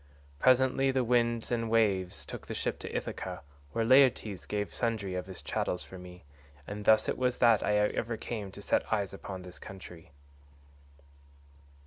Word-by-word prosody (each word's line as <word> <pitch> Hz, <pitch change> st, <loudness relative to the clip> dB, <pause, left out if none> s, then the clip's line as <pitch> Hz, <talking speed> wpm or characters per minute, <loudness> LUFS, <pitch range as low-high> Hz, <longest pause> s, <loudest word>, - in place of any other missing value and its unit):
Presently 130 Hz, -, +4 dB
the 130 Hz, -1 st, +2 dB
winds 120 Hz, -1 st, +1 dB
and 115 Hz, -1 st, 0 dB
waves 100 Hz, -5 st, +1 dB
took -, -, -8 dB
the -, -, -4 dB
ship -, -, -2 dB
to -, -, -6 dB
Ithaca, -, -, -4 dB, 0.3 s
where 115 Hz, -1 st, 0 dB
Laertes 125 Hz, -6 st, +4 dB
gave 105 Hz, -1 st, -2 dB
sundry 110 Hz, -5 st, -1 dB
of 90 Hz, 0 st, -4 dB
his 95 Hz, -, -9 dB
chattels 90 Hz, -, -2 dB
for 95 Hz, -, -11 dB
me, 90 Hz, 0 st, -12 dB, 0.4 s
and 105 Hz, +3 st, -6 dB
thus 110 Hz, 0 st, +5 dB
it -, -, -1 dB
was 125 Hz, -1 st, +1 dB
that 115 Hz, -3 st, +5 dB
ever 105 Hz, +2 st, +1 dB
I -, -, -10 dB
came 105 Hz, -4 st, -5 dB
to 100 Hz, -, -9 dB
set -, -, 0 dB
eyes 100 Hz, -3 st, 0 dB
upon 95 Hz, -1 st, -7 dB
this 90 Hz, -1 st, -11 dB
country." 90 Hz, -3 st, -11 dB
105 Hz, 165 wpm, -30 LUFS, 95-120 Hz, 0.4 s, thus